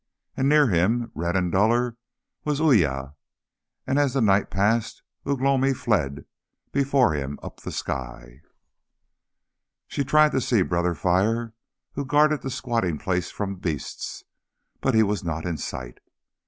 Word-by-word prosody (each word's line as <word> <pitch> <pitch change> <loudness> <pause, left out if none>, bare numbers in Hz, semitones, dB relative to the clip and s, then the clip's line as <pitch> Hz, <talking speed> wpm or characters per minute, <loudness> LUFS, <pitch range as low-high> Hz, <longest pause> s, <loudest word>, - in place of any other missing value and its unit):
And 135 +1 +1
near 150 0 +6
him, 115 +4 +1
red 85 +2 -2
and 90 -2 +1
duller, 115 +5 +2 0.5
was 150 -1 -1
Uya, 75 - +2 0.7
and 135 +2 +1
as 140 -2 +1
the - - +2
night 100 -2 +3
passed 105 +4 0 0.2
Ugh 140 -2 0
lomi 135 0 +2
fled 70 - -1 0.5
before 140 - +2
him 70 -1 -3
up - - -9
the - - -6
sky. 65 0 -6 1.4
She 140 - -2
tried 155 +2 +4
to 130 - 0
see 115 -7 +2
Brother 85 0 0
Fire, 105 +8 +1 0.4
who 140 - -3
guarded 150 +2 +3
the 135 - -4
squatting 120 - -1
place 90 +1 -2
from 100 -2 -4
beasts, 80 -6 -5 0.6
but - - +1
he 110 - +6
was 105 -1 -1
not 80 -1 -3
in 85 -2 -2
sight. - - -6
105 Hz, 145 wpm, -24 LUFS, 85-130 Hz, 1.4 s, near